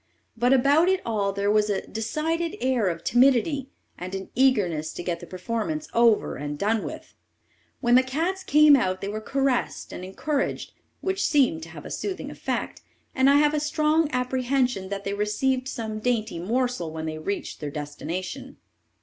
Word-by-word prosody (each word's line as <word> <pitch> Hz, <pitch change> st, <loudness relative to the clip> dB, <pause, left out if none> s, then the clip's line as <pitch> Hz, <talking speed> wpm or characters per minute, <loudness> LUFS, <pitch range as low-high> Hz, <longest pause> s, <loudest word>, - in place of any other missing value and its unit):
But 240 Hz, +2 st, +2 dB
about 280 Hz, +6 st, +5 dB
it 380 Hz, 0 st, +2 dB
all 205 Hz, -3 st, 0 dB
there 200 Hz, +1 st, 0 dB
was 210 Hz, 0 st, +3 dB
a 200 Hz, -2 st, -1 dB
decided 320 Hz, +9 st, -2 dB
air 250 Hz, -4 st, +1 dB
of 170 Hz, -1 st, -2 dB
timidity, 265 Hz, +3 st, +3 dB, 0.3 s
and 185 Hz, +2 st, -5 dB
an 190 Hz, 0 st, -7 dB
eagerness 190 Hz, -, +2 dB
to -, -, -6 dB
get 175 Hz, -1 st, -2 dB
the -, -, -10 dB
performance 230 Hz, -, -3 dB
over, 230 Hz, -2 st, +3 dB
and 145 Hz, +1 st, -4 dB
done 215 Hz, +5 st, +1 dB
with -, -, -4 dB
it. -, -, -17 dB, 0.7 s
When 240 Hz, -2 st, +2 dB
the 255 Hz, -, +8 dB
cats 330 Hz, +9 st, -2 dB
came 300 Hz, -2 st, +7 dB
out 185 Hz, -7 st, 0 dB
they 195 Hz, -, -3 dB
were 215 Hz, +2 st, -4 dB
caressed 270 Hz, +1 st, -1 dB
and 180 Hz, -, -7 dB
encouraged, 275 Hz, +10 st, -2 dB, 0.3 s
which 385 Hz, +1 st, -1 dB
seemed 265 Hz, -, +3 dB
to 165 Hz, -, -9 dB
have 160 Hz, -3 st, -10 dB
a -, -, -7 dB
soothing 385 Hz, -2 st, -4 dB
effect, -, -, -4 dB, 0.3 s
and 260 Hz, 0 st, +4 dB
I 280 Hz, -, +6 dB
have 295 Hz, +1 st, +4 dB
a 305 Hz, -, +1 dB
strong 305 Hz, +1 st, +2 dB
apprehension 250 Hz, -5 st, 0 dB
that 200 Hz, 0 st, -4 dB
they 200 Hz, -, -2 dB
received 255 Hz, +6 st, 0 dB
some 220 Hz, -4 st, -4 dB
dainty 220 Hz, -6 st, -1 dB
morsel 235 Hz, -3 st, -1 dB
when 160 Hz, 0 st, -5 dB
they 155 Hz, 0 st, -4 dB
reached 200 Hz, +6 st, -4 dB
their 150 Hz, -, -4 dB
destination. 175 Hz, -, -6 dB
240 Hz, 180 wpm, -25 LUFS, 195-275 Hz, 0.7 s, the